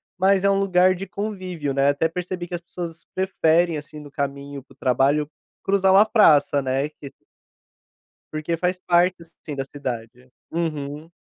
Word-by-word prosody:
mas 190 +1 +3
é 200 - +4
um 195 0 +2
lugar 185 -1 +4
de 185 +1 -6
convívio, 185 -8 -4
né, 140 +1 +2
até 145 +3 +1
percebi 180 +1 -5
que 175 - -10
as 175 - -3
pessoas 170 -1 -7
preferem, 175 -3 +2
assim, 150 0 -8
no 145 -1 -12
caminho 140 0 -4
para 135 - -21
o - - -30
trabalho, 135 +4 +2 0.4
cruzar 195 -1 +3
uma 200 +3 +7
praça, 150 -10 +4
né, 135 +2 -1
que 150 -1 -12 1.3
porque 155 +2 -2
faz 180 +2 -1
parte, 180 0 +2
assim, 160 -3 -10
da 135 - -2
cidade. 125 -3 -7 0.2
Uhum. 155 -2 -3
165 Hz, 165 wpm, -23 LUFS, 140-185 Hz, 1.3 s, uma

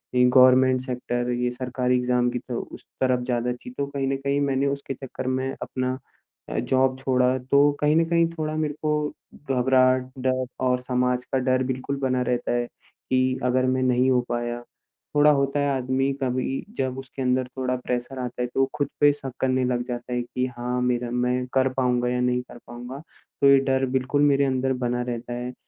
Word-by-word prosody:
ये 125 - +5
government 130 0 +6
sector 125 -1 -3
ये 125 0 0
सरकारी 125 0 -1
एग्ज़ाम 125 0 +2
की 125 - -3
तो 120 -2 -5
उस - - -11 0.2
तरफ़ 130 -1 +2
ज़्यादा 125 0 -1
थी। 125 - -11
तो 140 - 0
कहीं 140 -1 -2
न 135 - 0
कहीं 140 +1 -1
मैंने 140 0 +1
उसके 140 -1 -3
चक्कर 130 0 -7
में 130 +1 0
अपना 130 0 -2 0.5
अ, - - -1
जॉब 130 0 +1
छोड़ा 130 -1 +2
तो 140 +3 +4
कहीं 150 +1 +3
न 165 0 +4
कहीं 170 -1 +3
थोड़ा 155 0 -2
मेरे 155 -1 -1
को 150 -1 0 0.4
घबराहट, 130 0 +3
डर 130 0 0 0.2
और 125 0 +2
समाज 125 0 0
का 135 - +2
डर 130 0 +1
बिल्कुल 130 +2 -3
बना 130 -1 +1
रहता 125 -1 -1
है 120 0 0
कि 130 +1 -2
अगर 130 +1 +2
मैं 130 0 +1
नहीं 130 +1 +3
हो 125 -1 +3
पाया। 120 0 -3 0.5
थोड़ा 150 +1 +6
होता 140 0 +1
है 145 0 +1
आदमी 130 +2 0
कभी 130 +1 -1
जब 130 0 -1
उसके 135 0 -8
अंदर 125 0 +1
थोड़ा 130 -1 0
प्रेशर 125 +1 -4
आता 125 0 -4
है 125 - 0
तो - - -1
वो 135 - +4
खुद 145 -2 0
पे 145 0 +7
शक 135 -2 -7
करने 130 -1 +1
लग 125 -1 0
जाता 125 0 -5
है 125 - 0
कि 125 +1 -2
हाँ, 125 +1 -2
मेरा 125 -1 0
मैं 125 +1 0
कर 130 0 +3
पाऊँगा 125 -2 +1
या 125 0 0
नहीं 125 0 +1
कर 125 - -13
पाऊँगा। 125 +3 -8 0.4
तो 140 - +6
ये 140 - +8
डर 135 0 +2
बिल्कुल 130 +2 +1
मेरे 140 -1 +4
अंदर 130 0 0
बना 120 0 0
रहता 120 0 -4
है। 125 +1 -4
130 Hz, 205 wpm, -24 LUFS, 125-135 Hz, 0.5 s, ये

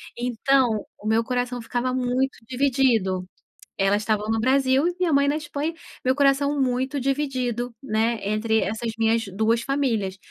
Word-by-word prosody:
Então, 245 -1 +1
o 215 - -7
meu 225 +1 +3
coração 245 0 -2
ficava 245 +2 -1
muito 255 +1 0
dividido. 245 -8 +1 0.6
Elas 200 +2 +2
estavam 215 0 -1
no 225 0 +1
Brasil 265 +3 +3
e 355 - -6
minha 350 -4 +2
mãe 280 0 +4
na 295 - +1
Espanha, 300 +1 -3 0.3
meu 255 - +3
coração 280 +1 +2
muito 260 +2 0
dividido, 255 -3 -1
né, 225 -2 0
entre 220 +1 +1
essas 220 +2 -2
minhas 225 0 +2
2 220 +3 +1
famílias, 235 -8 -1
245 Hz, 150 wpm, -24 LUFS, 220-270 Hz, 0.6 s, mãe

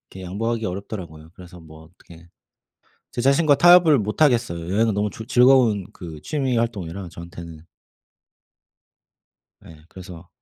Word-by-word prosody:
이렇게 95 - -10
양보하기 115 +5 -3
어렵더라고요. 90 -5 -8
그래서 90 -2 -14
뭐 80 0 -15
어떻게 85 0 -18 0.8
제 - - -4
자신과 140 +3 +3
타협을 175 -5 +6
못 105 +7 -5
하겠어요. 95 - +1
여행은 110 0 +1
너무 105 +1 -1
좋 110 - -10
즐거운 120 -5 +3
그 80 -4 -10
취미 135 -5 -2
활동이라 100 -6 -4
저한테는. 85 -1 -11 2.0
예. 80 - -13
그래서 90 -2 -12
100 Hz, 325 characters per minute, -21 LUFS, 85-120 Hz, 2.0 s, 타협을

